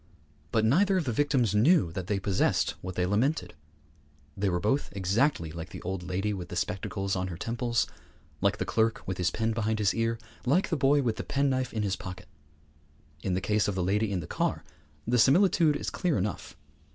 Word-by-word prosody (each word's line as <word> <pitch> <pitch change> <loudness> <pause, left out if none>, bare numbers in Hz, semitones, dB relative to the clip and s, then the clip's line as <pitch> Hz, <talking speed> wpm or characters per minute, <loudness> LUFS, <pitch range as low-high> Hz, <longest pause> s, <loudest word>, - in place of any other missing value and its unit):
But 110 -1 +2
neither 190 - +4
of 175 - 0
the 125 - 0
victims 125 -4 +1
knew 120 - +4
that 90 +1 -5
they 105 - 0
possessed 95 -1 +1
what 90 0 -6
they 90 - +1
lamented. 120 - 0 0.8
They 100 0 0
were 90 -1 0
both 110 +9 0
exactly 100 - +1
like 80 +1 -7
the - - -9
old 95 0 -3
lady 95 +4 -2
with 90 -3 -6
the - - -6
spectacles 95 +1 -2
on 90 0 -1
her 85 -3 -6
temples, 115 +3 0 0.6
like 100 +1 +2
the 95 - -2
clerk 110 +5 0
with 95 -1 -3
his 90 -1 +2
pen 115 0 -1
behind 110 -1 0
his 105 -3 +2
ear, 115 0 0 0.3
like 150 +10 +2
the 165 - +1
boy 140 0 +3
with 115 -3 0
the - - -3
penknife 135 -2 0
in 110 -2 -2
his 100 -2 0
pocket. 95 +1 -8 0.9
In 90 +2 -1
the 95 - -1
case 105 +1 +1
of 100 - -1
the 95 - 0
lady 105 +3 +1
in 95 -3 -1
the - - -7
car - - -1 0.4
the 120 +1 +2
similitude 160 - +4
is - - -3
clear 175 -5 0
enough. 100 +2 -4
105 Hz, 205 wpm, -28 LUFS, 95-130 Hz, 0.9 s, neither